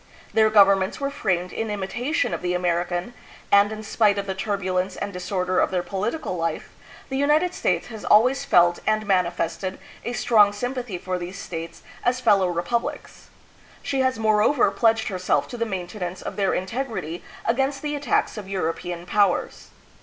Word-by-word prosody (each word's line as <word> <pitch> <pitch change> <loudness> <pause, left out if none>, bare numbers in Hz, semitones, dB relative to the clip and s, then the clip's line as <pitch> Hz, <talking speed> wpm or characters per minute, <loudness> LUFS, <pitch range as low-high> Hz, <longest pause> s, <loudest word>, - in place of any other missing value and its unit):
Their 220 -1 +5
governments 195 -2 +4
were 280 0 -2
framed 180 -9 -1
in 225 -1 -3
imitation 235 - -1
of - - -3
the 180 0 -1
Amer 175 -1 +1
ican, 175 +5 -4 0.4
and 200 +1 +5
in 215 0 -6
spite 210 -1 +2
of 200 - -2
the 190 - -2
turbulence 190 -2 -2
and 200 - -5
disorder 180 0 -1
of - - +3
their 180 -1 -1
political 205 - -3
life, 165 -1 -3 0.4
the 265 - -2
United 300 +6 +2
States - - 0
has 220 -2 -8
always 255 +6 +4
felt 175 -9 +4
and 215 0 +1
mani 185 -3 +2
fested 180 +2 -3 0.3
a 240 - -3
strong 215 -3 +4
sympathy 245 -2 -4
for 185 +1 -3
these 180 +3 -6
states 165 -3 -7 0.2
as 250 +1 +1
fellow 205 -6 +4
repub 180 +7 0
lics. - - -8 0.6
She 270 - -1
has 260 -2 +1
moreover 220 +4 +3
pledged 225 -1 +2
herself 185 -2 0
to - - -6
the 230 0 -1
mainte 190 0 -5
nance 180 0 -5
of - - -5
their 195 -2 +1
integrity 185 - -4 0.2
against 270 +4 0
the 295 0 -2
attacks 285 -5 0
of 195 -2 -9
European 175 -1 -3
powers. 200 -1 +1
200 Hz, 175 wpm, -24 LUFS, 180-235 Hz, 0.6 s, Their